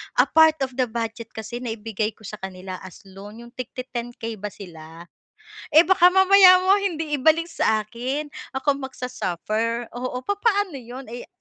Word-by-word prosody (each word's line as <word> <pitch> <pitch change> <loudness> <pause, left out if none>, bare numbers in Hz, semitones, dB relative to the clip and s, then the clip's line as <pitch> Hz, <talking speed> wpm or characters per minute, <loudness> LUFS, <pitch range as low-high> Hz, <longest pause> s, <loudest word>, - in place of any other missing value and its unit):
a - - +6
part 320 -1 +5
of 260 - -3
the 250 - +2
budget 225 0 -5
kasi 230 +2 -6
naibigay 220 -2 -4
ko 215 - -21
sa 215 +1 -8
kanila 185 -1 -7
as 190 -2 -13
loan 200 +4 -12
'yong 235 - -14
tig-ti 255 0 -7
10, 240 0 -5
10k 225 -2 -6
ba 210 - -4
sila 165 -4 -11 0.7
eh, 315 +3 +6
baka 360 -2 +6
mamaya 380 -1 +7
mo 385 - +6
hindi 325 -6 -2
ibalik 320 +3 +4
sa - - -2 0.2
akin 255 +7 -4 0.3
ako 280 +1 0
mag-sa-suffer, 230 -2 -3
oo, 250 0 -4
papaano 405 - 0
yun 245 +3 -9
eh. 240 - -8
240 Hz, 170 wpm, -23 LUFS, 215-310 Hz, 0.7 s, mamaya